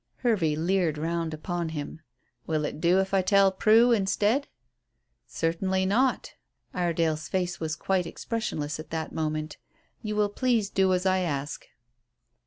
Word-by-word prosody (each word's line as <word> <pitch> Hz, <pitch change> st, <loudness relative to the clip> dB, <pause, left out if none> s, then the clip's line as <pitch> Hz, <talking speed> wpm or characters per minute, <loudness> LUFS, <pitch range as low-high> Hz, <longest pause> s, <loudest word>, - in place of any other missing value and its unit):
Hervey 180 Hz, -10 st, +2 dB
leered 170 Hz, -1 st, +1 dB
round 165 Hz, +1 st, -2 dB
upon 170 Hz, +2 st, -3 dB
him. 155 Hz, 0 st, -6 dB, 0.5 s
"Will 155 Hz, -2 st, 0 dB
it 150 Hz, -, -5 dB
do 180 Hz, +2 st, +4 dB
if 190 Hz, 0 st, -1 dB
I 195 Hz, -, +4 dB
tell 195 Hz, +1 st, +4 dB
Prue 225 Hz, +5 st, +5 dB
instead?" 215 Hz, +5 st, +1 dB, 0.8 s
"Certainly 190 Hz, +3 st, -1 dB
not." 250 Hz, +7 st, +1 dB, 0.4 s
Iredale's 165 Hz, -3 st, 0 dB
face 180 Hz, -2 st, -1 dB
was 155 Hz, -1 st, -2 dB
quite 185 Hz, -2 st, 0 dB
expressionless 160 Hz, -8 st, -4 dB
at 155 Hz, -1 st, -9 dB
that 160 Hz, -1 st, -4 dB
moment. 155 Hz, -1 st, -3 dB, 0.4 s
"You 215 Hz, -2 st, -3 dB
will 210 Hz, -1 st, +2 dB
please 225 Hz, -2 st, 0 dB
do 190 Hz, -1 st, +2 dB
as 180 Hz, +1 st, -2 dB
I 190 Hz, 0 st, +3 dB
ask." 145 Hz, -4 st, -3 dB
180 Hz, 145 wpm, -27 LUFS, 160-195 Hz, 0.8 s, Prue